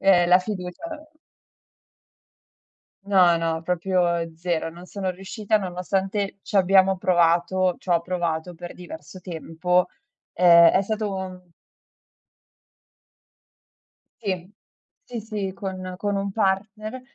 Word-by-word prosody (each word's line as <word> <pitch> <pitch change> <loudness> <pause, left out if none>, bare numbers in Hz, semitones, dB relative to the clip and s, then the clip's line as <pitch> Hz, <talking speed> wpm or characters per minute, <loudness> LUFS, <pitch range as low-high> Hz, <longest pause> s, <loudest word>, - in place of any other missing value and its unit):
ehm, 180 -3 +5
la 180 +1 +7
fiducia. 185 - -6 2.2
No, 185 -4 +5
no, 165 -1 -1
proprio 180 +1 0 0.3
0. 165 0 -2
Non 175 +2 -12
sono 190 -1 -4
riuscita 200 +3 -1
nonostante 195 +2 -2
ci - - -7
abbiamo 190 0 +5
provato 175 +1 +2
c'ho 175 -3 +1
provato 175 -1 -2
per 175 +1 -8
diverso 175 0 -10
tempo. 180 +1 0 0.5
Ehm, 170 -1 +8
è 190 - +3
stato 215 0 -2
un 185 -1 -6 2.8
Sì. 185 -3 -3 0.5
Sì, 240 - -5
sì, 210 -3 -4
con 185 -2 -6
con 205 +1 -1
un 195 0 -2
partner. 215 +4 -1
185 Hz, 105 wpm, -24 LUFS, 175-195 Hz, 2.8 s, Ehm